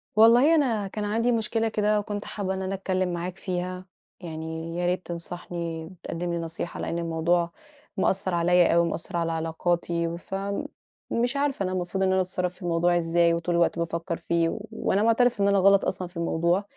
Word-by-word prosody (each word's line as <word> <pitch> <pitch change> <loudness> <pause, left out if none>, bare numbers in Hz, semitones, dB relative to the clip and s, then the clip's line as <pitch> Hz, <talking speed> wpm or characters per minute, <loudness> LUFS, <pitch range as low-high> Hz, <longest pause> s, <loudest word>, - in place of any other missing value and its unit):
والله، 240 +8 +7
أنا 230 -9 +1
كان 210 +2 -4
عندي 230 +4 +1
مشكلة 225 0 0
كده 210 -1 +2
وكنت 205 0 -4
حابّة 195 -2 -3
إن 190 - -3
أنا 190 +1 -2
أتكلّم 185 -2 -1
معاك 175 +2 -4
فيها، 185 0 -4 0.3
يعني 160 0 -5
يا 175 - 0
ريت 180 +1 0
تنصحني 170 -1 -5
وتقدّم 175 0 -5
لي 170 - -1
نصيحة 165 +1 -5
لإن 170 - -2
الموضوع 170 +1 +1 0.5
مأثّر 190 -1 +1
عليَّ 175 0 +4
أوي، 170 0 +4
مأثّر 165 +1 -4
على 165 -1 0
علاقاتي، 170 +1 -1
ف 185 +2 -7 0.8
مش 245 +4 0
عارفة 280 -7 0
أنا 185 - -1
المفروض 185 +1 -1
إن 190 - +3
أنا 190 - +3
أتصرّف 180 -1 -2
في - - -20
الموضوع 175 0 +2
إزاي، 170 0 +3
وطول 170 +1 -1
الوقت 170 0 +2
بافكّر 170 0 -2
فيه 170 -1 +1
و 210 - -5
وأنا 210 -2 0
معترفة 230 0 +3
إن - - +4
أنا 200 0 +4
غلط 195 +1 +5
أصلًا 180 - -2
في 175 - -13
الموضوع، 170 +3 +1
180 Hz, 185 wpm, -26 LUFS, 170-200 Hz, 0.8 s, والله